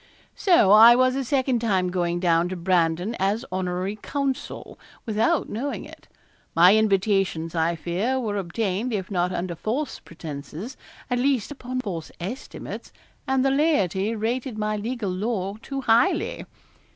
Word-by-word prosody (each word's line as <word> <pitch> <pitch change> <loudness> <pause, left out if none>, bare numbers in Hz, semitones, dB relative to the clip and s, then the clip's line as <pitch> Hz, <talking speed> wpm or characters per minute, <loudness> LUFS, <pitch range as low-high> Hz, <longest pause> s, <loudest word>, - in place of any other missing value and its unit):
So 345 - +4
I 225 +3 +9
was 255 +1 +3
a 270 - -1
second 260 -1 +1
time 190 -5 +1
going 175 -1 -1
down 170 -1 +2
to 185 - -4
Brandon 175 +2 +1
as 200 +4 0
honorary 185 +2 -2
counsel, 275 +4 -4 0.3
without 230 +9 +1
knowing 265 +7 -4
it. - - -14 0.5
My 180 +4 +7
invitations, 195 -5 +1
I 165 0 +1
fear, 195 +11 -1
were 210 -5 -2
obtained, 200 +5 -2
if 195 -1 -3
not 180 -1 0
under 175 -1 -3
false 245 - -3
pretences, 165 - -8 0.4
at 245 - +1
least 260 -2 +1
upon 255 -2 -4
false 175 -8 -5
estimates, 200 +10 -7 0.4
and 265 0 +2
the 270 - +3
laity 225 - +1
rated 235 +2 -2
my 215 0 -1
legal 215 -1 -3
lore 200 +1 -2
too 275 +3 -5
highly. 235 0 +2
210 Hz, 145 wpm, -24 LUFS, 180-250 Hz, 0.5 s, I